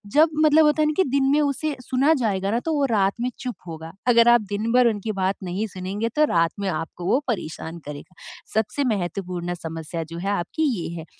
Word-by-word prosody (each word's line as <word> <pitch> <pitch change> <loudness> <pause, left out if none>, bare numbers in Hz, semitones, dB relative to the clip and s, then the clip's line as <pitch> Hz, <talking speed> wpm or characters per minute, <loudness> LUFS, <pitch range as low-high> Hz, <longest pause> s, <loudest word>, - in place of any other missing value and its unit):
जब 315 +2 +6 0.2
मतलब 310 +1 +6
होता 300 +1 +3
है 305 - +3
ना 305 - +1
कि 380 - +5
दिन 275 +1 +2
में 295 - +4
उसे 290 +1 -1
सुना 265 +5 +2
जाएगा 195 -2 0
ना 230 - +1
तो 325 - 0
वो 285 -1 +2
रात 195 -1 +2
में 250 - 0
चुप 250 -2 -4
होगा 160 0 -7 0.2
अगर 235 -1 +6
आप 240 - +5
दिन 215 +3 -1
भर 250 -1 +5
उनकी 215 -1 -1
बात 190 +1 +1
नहीं 190 +4 -2
सुनेंगे 195 +5 -3
तो 305 0 +5
रात 165 -1 +3
में 200 -1 -1
आपको 165 +1 -5
वो 250 - +3
परेशान 170 -6 -4
करेगा। 150 +5 -9 0.4
सबसे 220 +6 0
महत्वपूर्ण 175 -1 -3
समस्या 165 0 -5
जो - - -5
है 195 +3 -2
आपकी 200 - -2 0.2
ये 165 - -4
है 160 - -8
205 Hz, 220 wpm, -23 LUFS, 175-260 Hz, 0.4 s, जब